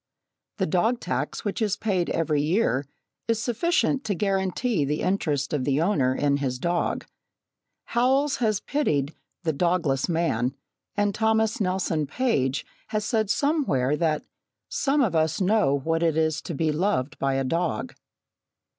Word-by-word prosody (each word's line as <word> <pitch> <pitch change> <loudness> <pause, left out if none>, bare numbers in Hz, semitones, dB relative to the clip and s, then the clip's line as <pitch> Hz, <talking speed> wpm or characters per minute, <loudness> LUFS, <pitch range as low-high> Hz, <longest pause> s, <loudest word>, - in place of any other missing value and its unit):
The 190 - +1
dog 220 +9 +1
tax - - -3
which 205 +2 -2
is 210 -2 +1
paid 190 -5 0
every 155 -3 +1
year 150 - +1 0.4
is 230 -1 +1
sufficient 270 +3 +1
to 205 - 0
guarantee 195 - 0
the 145 +2 -1
interest 150 -8 0
of 145 -3 0
the 140 +1 +1
owner 145 -8 +2
in 140 -1 +2
his 130 -3 -2
dog. 170 +6 -1 0.8
Howells 265 +4 +2
has 215 -4 +1
pitied 150 - 0 0.3
"the 160 -2 0
dogless 165 -3 +1
man," 140 -7 0 0.4
and 205 -1 +2
Thomas 220 +1 +1
Nelson 180 -5 0
Page 145 - 0 0.2
has 215 -1 -2
said 220 -3 0
somewhere 240 - +1
that 155 -1 0 0.5
"some 285 +1 +1
of 205 -10 +1
us 160 0 +1
know 185 -8 +3
what 165 +4 -1
it 165 -2 +2
is 155 -1 +1
to - - -5
be 155 +2 +1
loved 155 -4 -1
by 135 0 +1
a 135 - +1
dog." 165 -2 -1
170 Hz, 150 wpm, -25 LUFS, 145-220 Hz, 0.8 s, know